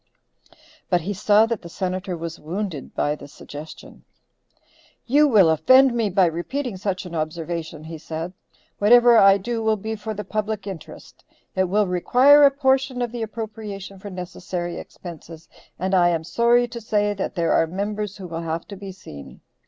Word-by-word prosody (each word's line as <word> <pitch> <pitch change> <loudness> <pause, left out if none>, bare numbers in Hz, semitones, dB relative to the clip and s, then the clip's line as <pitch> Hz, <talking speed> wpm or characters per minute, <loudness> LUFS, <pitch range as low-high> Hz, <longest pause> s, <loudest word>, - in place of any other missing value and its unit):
But 180 -2 +2
he 195 +6 -3
saw 210 +2 +4
that 225 -2 -3
the 170 - -10
Senator 185 0 -3
was 165 0 -6
wounded 170 -2 -5
by 145 - +1
the 150 - -10
suggestion. 145 +2 -11 1.0
"You 295 +4 +4
will 210 - +5
offend 255 - +5
me 230 -3 0
by 190 0 +3
repeating 200 - -3
such 185 -1 -3
an 175 - -9
observation," 160 0 -4
he 160 0 -8
said. 165 +2 -6 0.5
"Whatever 235 +2 +6
I 195 -1 +7
do 225 +4 -3
will 220 -1 +1
be 220 +2 -4
for 220 0 -6
the 210 - -5
public 210 +1 -3
interest. 190 -6 -10 0.3
It 190 - +2
will 205 +3 +2
require 250 +11 +5
a - - +8
portion 265 -2 +1
of 240 - -3
the 240 -1 -5
appropriation 210 -3 -6
for 205 - -8
necessary 180 -1 -5
expenses, 165 -2 -11 0.3
and 190 +2 -2
I 175 -2 +5
am 165 -2 -1
sorry 235 +6 +3
to 235 -1 -7
say 210 -1 0
that 195 -1 -4
there 170 -2 +1
are 165 - +3
members 205 +3 -4
who 190 - -8
will 165 -1 -5
have 165 0 -4
to 200 - -7
be 195 0 -8
seen. 75 - -12
195 Hz, 175 wpm, -23 LUFS, 170-220 Hz, 1.0 s, a